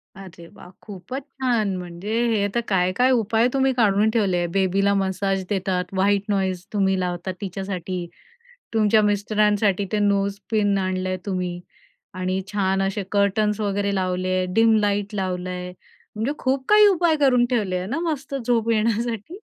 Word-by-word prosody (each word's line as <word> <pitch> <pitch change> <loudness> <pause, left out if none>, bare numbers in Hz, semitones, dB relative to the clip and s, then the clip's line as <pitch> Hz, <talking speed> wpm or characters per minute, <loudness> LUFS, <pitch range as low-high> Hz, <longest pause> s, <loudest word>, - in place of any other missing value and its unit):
अरे, 185 -3 -12
वाह, - - -14
खूपच 210 +7 -7
छान! 235 -8 -1
म्हणजे 180 +3 -7 0.2
हे 210 -3 +1
तर 235 - +2
काय 185 -2 +2
काय 255 +1 +4
उपाय 225 0 +2
तुम्ही 270 0 +2
काढून 215 -3 +3
ठेवले 200 -6 +1
आहे, 175 0 0
बेबीला 195 +2 +1
मसाज 195 0 -1
देतात, 185 -2 -1
व्हाईट 200 +1 +2
नॉईज 190 -2 -1
तुम्ही 195 -2 +1
लावतात 180 +1 -3
तिच्यासाठी. 185 -2 -4 0.7
तुमच्या 215 0 +4
मिस्टरांसाठी 205 -1 +1
ते 210 - +1
नोज 200 -1 +1
पिन 205 -2 +2
आणलंय 185 -1 -2
तुम्ही 180 -3 -3 0.6
आणि 185 +1 -2
छान 195 -1 +1
असे 195 +1 -1
कर्टन्स 205 +1 +1
वगैरे 200 -1 -1
लावले 185 -1 -1
आहे, 185 - 0
डिम 225 0 +5
लाईट 205 0 -1
लावलं 185 -2 -3
आहे, 180 0 -5 0.4
म्हणजे 220 +6 -1
खूप 260 0 -1
काही 420 0 +7
उपाय 345 -5 +3
करून 260 -4 +3
ठेवले 205 -7 0
आहे 180 - -4
ना 275 +9 -2
मस्त 280 -1 -5
झोप 230 -2 +1
येण्यासाठी? 230 - -1
200 Hz, 155 wpm, -23 LUFS, 185-220 Hz, 0.7 s, काही